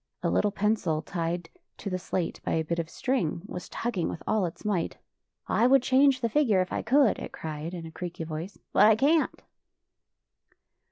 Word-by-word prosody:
A - - +1
little 210 - +3
pencil, 200 -6 0
tied 170 +1 -3 0.3
to - - -8
the 185 -2 -1
slate 180 -1 -3
by - - -1
a 160 - +1
bit 170 +2 -2
of 165 -1 -3
string, 180 - -1
was 180 -3 -7
tugging 225 -8 -2
with - - -6
all 215 -4 +1
its 165 - -10
might. 190 -6 -1 0.3
" - - -59
I 235 - +3
would 270 -1 +5
change 260 0 +4
the 235 - +2
figure 225 -5 +3
if 185 - -1
I - - -1
could," 265 +1 +3
it - - -6
cried 160 +2 -5
in 170 -2 -6
a 160 - -8
creaky 175 0 -6
voice, 160 +4 -6
" - - -52
but 205 - +7
I 220 - +6
can't." 300 +7 +2
185 Hz, 205 wpm, -28 LUFS, 165-235 Hz, 0.3 s, but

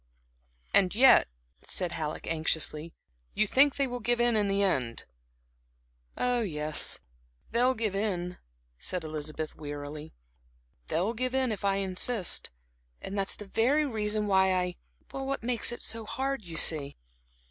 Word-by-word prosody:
"And 190 -1 +4
yet," 260 +4 +7 0.3
said 180 -3 -2
Halleck, 155 -1 -4
anxiously, 160 0 -1 0.4
"you 215 - +3
think 270 +6 +4
they 280 - +1
will 245 -1 -4
give 240 0 0
in 240 -1 +3
in 210 -2 +2
the 200 0 +1
end?" 130 -11 0 1.1
"Oh, 245 -1 +1
yes, 155 -6 0 0.5
they'll 250 +3 +3
give 215 -3 -2
in," 180 -4 -2 0.4
said 180 - -2
Elizabeth, 155 0 -5
wearily. 145 +1 -7 0.7
"They'll 195 +7 0
give 255 +2 -2
in, 260 -3 +1
if 210 - -5
I 195 -1 +2
insist; 195 +2 0 0.5
and 195 - -6
that's 195 -1 +1
the 210 - -9
very 260 +9 +2
reason 215 -4 -1
why 190 -2 +3
I 180 -1 -1 0.4
what 270 -2 -3
makes 240 -1 +2
it 240 - -7
so 225 -1 -1
hard, 270 +1 -2
you 165 -3 -7
see." 150 -4 +4
200 Hz, 145 wpm, -29 LUFS, 165-240 Hz, 1.1 s, yet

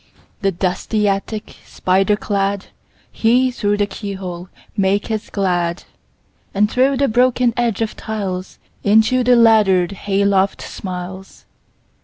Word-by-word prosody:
The 195 -1 +2
dusty 195 +4 -1
attic 200 +2 -3
spider 190 +3 +1
cladHe, 210 +5 -1
through 205 -4 0
the 205 - +2
keyhole, 190 -3 -7 0.3
maketh 205 +2 -1
glad; 175 -3 -1 0.7
And 210 +2 +2
through 265 +2 +2
the 280 +1 +2
broken 245 0 +2
edge 235 -3 0
of 220 - -4
tiles, 195 -4 -5 0.3
Into 220 +5 +4
the 250 0 +5
laddered 210 -6 +4
hay 200 0 -1
loft 195 -1 +1
smiles. 185 0 -8
200 Hz, 115 wpm, -19 LUFS, 190-225 Hz, 0.7 s, the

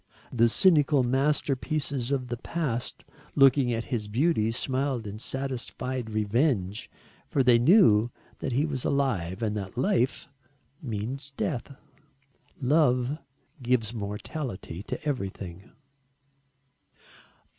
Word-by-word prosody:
The 115 -1 +4
cynical 150 - +4
masterpieces 135 0 0
of 130 -3 -1
the 120 - -3
past 130 -3 -3 0.3
looking 135 -2 +5
at 115 -1 -1
his 115 -5 -3
beauty 115 0 +2
smiled 130 0 -1
in 105 +1 -6
satisfied 130 -1 -4
revenge 110 - 0 0.4
for 135 - +1
they 125 -2 +5
knew 120 - +6 0.3
that 135 - -3
he 135 +5 +2
was 135 -5 -3
alive 110 -8 0
and 105 -1 0
that 100 +2 -6
life 135 - +1 0.5
means 130 +4 -5
death. 140 0 -3 0.8
Love 135 -1 +2 0.4
gives 120 -3 +1
mortality 105 - -5
to 130 -1 -3
everything. 95 - -4
125 Hz, 105 wpm, -27 LUFS, 110-140 Hz, 0.8 s, knew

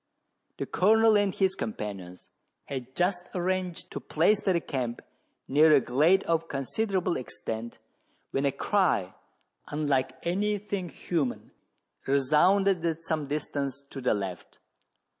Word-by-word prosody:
The - - -3
Colonel 220 +3 +4
and 205 -1 +3
his 190 0 +1
companions 100 - -6 0.4
had 130 -1 -6
just 180 0 0
arranged 185 -1 -2
to - - -4
place 185 +7 +2
their 185 -3 +2
camp 125 -7 -4 0.4
near 155 +3 +5
a - - +6
glade 150 +10 +3
of 165 0 0
considerable 180 - -1
extent, 115 -2 -5 0.5
when 135 - 0
a 140 - +3
cry, - - +1 0.5
unlike 145 -3 0
any 205 +4 0
thing 200 -3 -4
human, 155 -9 -3 0.6
resounded 165 +7 +3
at 165 -1 -1
some 155 -3 -2
distance 140 -2 -3
to 135 - -6
the 125 - +2
left. 95 -4 -6
160 Hz, 125 wpm, -28 LUFS, 135-185 Hz, 0.6 s, a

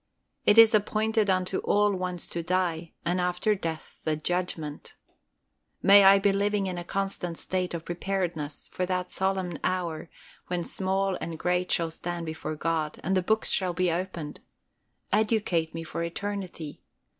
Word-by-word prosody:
"It 210 - +6
is 225 -1 +9
appointed 215 0 +2
unto 185 0 +1
all 205 0 +3
once 180 -1 -3
to 170 - -3
die, 170 -2 -1
and 180 +1 +1
after 180 +4 +1
death 165 -5 -5
the 155 - +1
judgment." 160 -2 -3 0.9
May 200 +1 +9
I 195 +1 +8
be 195 0 +3
living 200 0 +1
in 180 -2 -3
a - - -5
constant 185 -2 -3
state 185 -2 -2
of 165 -1 -6
preparedness 175 -5 -3
for 180 - -2
that 180 0 -2
solemn 190 -4 -1
hour 170 -3 -2 0.4
when 175 -1 -1
small 190 +1 -1
and 165 -1 -4
great 180 +2 0
shall 165 -1 +1
stand 170 +1 -4
before 160 -1 -4
God, 155 -1 -1
and 190 +3 +1
the 185 - +3
books 220 +4 +1
shall 185 -2 +1
be 180 0 +1
opened. 170 -3 -4 0.7
Educate 205 -7 +1
me 165 - -4
for 165 - -5
eternity. 180 -3 -5
180 Hz, 155 wpm, -27 LUFS, 165-195 Hz, 0.9 s, is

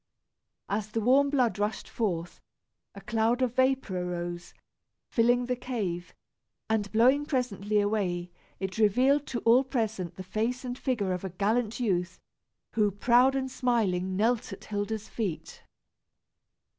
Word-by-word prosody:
As 210 +1 -2
the 225 - -2
warm 265 +5 +4
blood 250 -7 +1
rushed 210 +1 -2
forth, 175 -7 -3 0.5
a - - -9
cloud 230 +3 +1
of 245 -2 0
vapor 260 -8 +1
arose, 175 -1 -5 0.6
filling 245 +1 +3
the 250 0 -1
cave; 205 -9 -4 0.5
and 210 -2 0
blowing 255 +6 +4
presently 215 -7 0
away, 190 -4 -1 0.3
it 190 +2 -4
revealed 255 +7 +3
to 235 - -3
all 240 +3 +5
present 220 - -2
the 185 - -7
face 225 +7 -2
and 245 0 -3
figure 220 -8 -1
of 180 - -4
a 190 - -3
gallant 215 +5 0
youth, 180 -6 -1 0.5
who, 210 -2 +3
proud 245 +6 +4
and 265 -1 -2
smiling, 190 -8 0
knelt 225 +3 +1
at 195 - -9
Hilda's 210 +1 -3
feet. 200 -9 -4
220 Hz, 140 wpm, -28 LUFS, 195-245 Hz, 0.6 s, all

